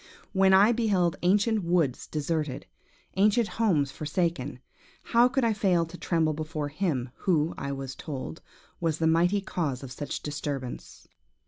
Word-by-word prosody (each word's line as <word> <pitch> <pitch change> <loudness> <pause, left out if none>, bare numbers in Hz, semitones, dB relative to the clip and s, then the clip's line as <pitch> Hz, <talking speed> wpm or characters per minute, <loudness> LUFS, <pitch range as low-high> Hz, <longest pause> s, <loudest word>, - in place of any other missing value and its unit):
When 190 -1 +4
I 200 +4 +7
beheld 200 -8 +1
ancient 205 +3 +2
woods 170 -7 +1
deserted, 150 -2 -2 0.5
ancient 210 +3 +4
homes 170 -13 +1
forsaken, 150 -3 -2 0.4
how 235 +1 +4
could 265 +1 0
I 225 - +3
fail 185 -5 +2
to 165 +2 -11
tremble 165 -3 0
before 155 -1 -4
him 145 -6 -1
who, 165 -4 +1
I 140 - -4
was 135 -1 -5
told, 145 +2 -6 0.4
was 165 -3 0
the 160 - 0
mighty 175 +5 +3
cause 155 -10 -3
of 130 - -8
such 145 +2 -5
disturbance? 145 -3 -5
165 Hz, 145 wpm, -27 LUFS, 145-195 Hz, 0.5 s, I